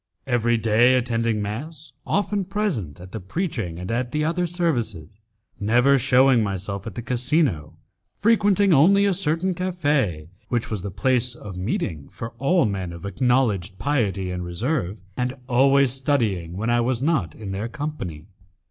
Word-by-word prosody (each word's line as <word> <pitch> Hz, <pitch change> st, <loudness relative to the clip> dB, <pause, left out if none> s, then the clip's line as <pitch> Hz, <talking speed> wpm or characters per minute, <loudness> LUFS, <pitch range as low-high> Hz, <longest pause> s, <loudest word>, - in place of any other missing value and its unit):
Every 120 Hz, -2 st, +2 dB
day 115 Hz, +3 st, +4 dB
attending 115 Hz, -3 st, 0 dB
mass, 145 Hz, +10 st, -6 dB, 0.2 s
often 205 Hz, 0 st, 0 dB
present 170 Hz, -, -2 dB
at 90 Hz, +1 st, -11 dB
the 110 Hz, -, -5 dB
preaching 105 Hz, -, -3 dB
and 90 Hz, +4 st, -5 dB
at 120 Hz, +1 st, -1 dB
the 150 Hz, +3 st, -1 dB
other 175 Hz, +2 st, 0 dB
services, 115 Hz, -, -2 dB, 0.4 s
never 120 Hz, +6 st, +4 dB
shewing 130 Hz, 0 st, +4 dB
myself 100 Hz, +1 st, -3 dB
at 105 Hz, -, -7 dB
the 120 Hz, -, -5 dB
casino, 125 Hz, -, 0 dB, 0.4 s
frequenting 205 Hz, -3 st, +3 dB
only 195 Hz, +8 st, +5 dB
a 200 Hz, -, +3 dB
certain 175 Hz, +1 st, 0 dB
cafe 145 Hz, -, -1 dB, 0.2 s
which 120 Hz, -2 st, -2 dB
was 105 Hz, -4 st, -2 dB
the 100 Hz, -, -4 dB
place 120 Hz, +5 st, +1 dB
of 100 Hz, -5 st, -9 dB
meeting 90 Hz, -, -3 dB
for 115 Hz, 0 st, -7 dB
all 140 Hz, +3 st, +3 dB
men 95 Hz, -4 st, -3 dB
of 85 Hz, +3 st, -9 dB
acknowledged 100 Hz, -3 st, +1 dB
piety 100 Hz, -9 st, -1 dB
and 90 Hz, 0 st, -4 dB
reserve, 105 Hz, -, -2 dB, 0.2 s
and 125 Hz, +1 st, -2 dB
always 135 Hz, +1 st, +4 dB
studying 110 Hz, -, -1 dB
when 110 Hz, +4 st, -1 dB
I 120 Hz, 0 st, +3 dB
was 120 Hz, 0 st, 0 dB
not 135 Hz, -, 0 dB
in 105 Hz, -3 st, -7 dB
their 100 Hz, +4 st, -3 dB
company. 115 Hz, -, -5 dB
120 Hz, 155 wpm, -23 LUFS, 100-145 Hz, 0.4 s, only